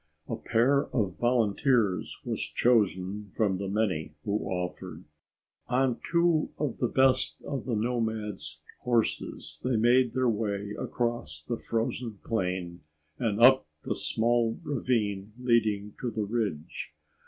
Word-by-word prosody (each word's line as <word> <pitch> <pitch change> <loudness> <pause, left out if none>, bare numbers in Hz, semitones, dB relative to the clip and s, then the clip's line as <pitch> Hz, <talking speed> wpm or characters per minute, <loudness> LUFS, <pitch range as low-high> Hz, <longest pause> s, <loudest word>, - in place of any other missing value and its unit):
A - - -2
pair 135 +5 +2
of 100 -7 -1
volunteers 120 -3 +2
was - - -2
chosen 105 -3 +1
from 100 -1 0
the 100 - -3
many 95 -7 -1
who 105 +1 0
offered. 90 -2 -4 0.6
On 125 -1 +1
two 170 -2 +3
of 150 -3 -2
the 125 - +2
best 115 - +3
of 140 -2 -4
the 120 - -1
nomads' 105 -9 -2 0.2
horses, 115 -10 -1
they 125 -1 +1
made 120 +2 +4
their 130 -1 +2
way 105 -2 -1
across 105 -11 -3
the 120 - -1
frozen 115 -1 -2
plain 90 -5 -2 0.4
and 110 -3 0
up 130 - +7 0.2
the - - -1
small 115 0 +1
ravine 110 -8 -1
leading 110 -4 +1
to 125 - -1
the 110 -1 -2
ridge. 100 -8 -3
110 Hz, 130 wpm, -29 LUFS, 100-125 Hz, 0.6 s, up